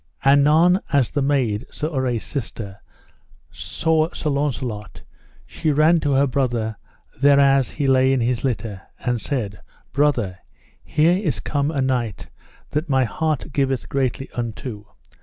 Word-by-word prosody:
Anon 150 +6 +5
as 140 -5 +2
the 145 - 0
maid, 130 -7 0
Sir 155 - -3
Urre's 125 -4 0
sister, 105 -7 -6 0.7
saw 160 0 0
Sir 150 - -2
Launcelot, 130 -7 -3 0.4
she 160 - -2
ran 155 +4 +4
to 145 -3 0
her 135 +1 +4
brother 120 -5 -1 0.4
thereas 140 -1 +5
he 145 - -3
lay 130 0 +4
in 135 - +2
his 120 0 0
litter, 105 -6 -2 0.2
and 120 -2 -1
said: 105 -9 -3 0.3
Brother, 120 -11 +1 0.4
here 170 +5 +2
is 145 - 0
come 145 +5 -1
a 145 -4 -1
knight 125 -6 -2 0.4
that 155 +2 -2
my 130 -1 +3
heart 155 +3 -2
giveth 135 -3 0
greatly 135 0 -1
unto. 115 -2 -5
135 Hz, 140 wpm, -22 LUFS, 120-145 Hz, 0.7 s, Anon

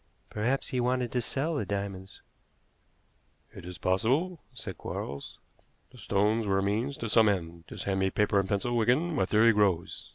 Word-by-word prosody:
"Perhaps 120 +6 -1
he 130 - -1
wanted 125 0 0
to 125 - 0
sell 140 +7 -1
the 145 - -1
diamonds." 100 -1 -5 1.3
"It - - -10
is 90 0 -8
possible," 135 - 0
said 110 -7 -8
Quarles. 70 +1 -6 0.5
"The - - -15
stones 105 +2 +1
were 95 -1 +2
a 95 - +1
means 115 +8 -1
to 115 - -4
some 110 0 +5
end. 85 -3 -3
Just - - -7
hand 95 -1 -1
me 95 0 +2
paper 105 0 +2
and 95 - -1
a - - -14
pencil, 115 +4 0
Wigan. 125 +10 +2
My 95 - +1
theory 115 +2 +5
grows. 100 -5 0
105 Hz, 185 wpm, -29 LUFS, 95-125 Hz, 1.3 s, some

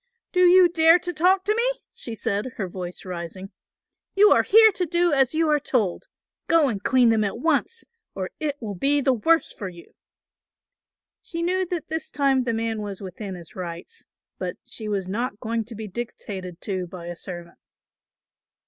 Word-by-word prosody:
"Do 360 - 0
you 360 0 +7
dare 330 0 +5
to 355 0 -4
talk 370 +4 +3
to 425 - +3
me?" - - +4
she 230 - -7
said, 220 +2 -2
her 195 - -2
voice 180 0 -7
rising. 180 +1 -7 0.6
"You 415 +2 +6
are - - +6
here 440 +1 +7
to 365 -2 -2
do 345 0 +3
as 270 +1 +3
you 325 0 +2
are 300 - +3
told; 225 -10 -1 0.4
go 325 -4 +4
and 205 -5 -4
clean 250 -2 +4
them 220 -1 +2
at 200 - -2
once, 325 - 0 0.3
or 190 -1 -4
it 290 -2 -3
will 215 -4 -5
be 280 +10 +1
the 270 -1 +2
worse 325 +8 +2
for 195 - -6
you." 175 -1 -15 1.3
She 335 0 -5
knew 370 +1 0
that 345 -3 -4
this 320 +1 -4
time 270 -3 +1
the 235 - 0
man 225 -1 -2
was 200 -2 -6
within 195 0 -7
his 170 -2 -13
rights; 180 - -8 0.3
but - - -4
she 215 -2 -5
was 195 -3 -2
not 210 +2 -3
going 230 -1 -2
to 230 +1 -9
be 215 0 -6
dictated 190 -4 -7
to 185 -3 -3
by 175 -1 -9
a 175 0 -6
servant. 175 -1 -8
235 Hz, 185 wpm, -24 LUFS, -, 1.3 s, you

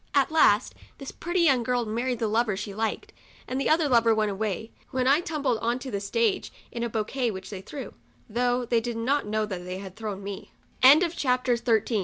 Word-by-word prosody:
At 280 +2 +3
last 250 -8 +4 0.2
this 275 - -7
pretty 345 +1 -2
young 275 -7 +4
girl 245 0 0
married 240 +3 -1
the 225 - -1
lover. 215 -2 +1
she 205 0 -5
liked, 220 +2 -3 0.3
and 260 +2 -2
the - - 0
other 315 -1 +3
lover 230 -3 +4
went 215 -1 +1
away, 215 +2 -3 0.2
when 255 -1 -1
I 280 +3 +5
tumbled 295 -9 -1
on 235 +2 0
to 255 0 -7
the 200 - -2
stage 405 - 0 0.2
in 235 - -5
a 235 - -1
bouquet 230 +3 -1
which 190 -2 -7
they 190 -2 -6
threw, 270 +5 -8 0.3
though 245 +2 0
they 235 -1 +1
did 235 0 -4
not 265 +3 0
know 215 +1 0
that 185 -4 -6
they 180 +1 -5
had 190 -1 -9
thro 215 -3 -4
235 Hz, 195 wpm, -26 LUFS, 215-260 Hz, 0.3 s, I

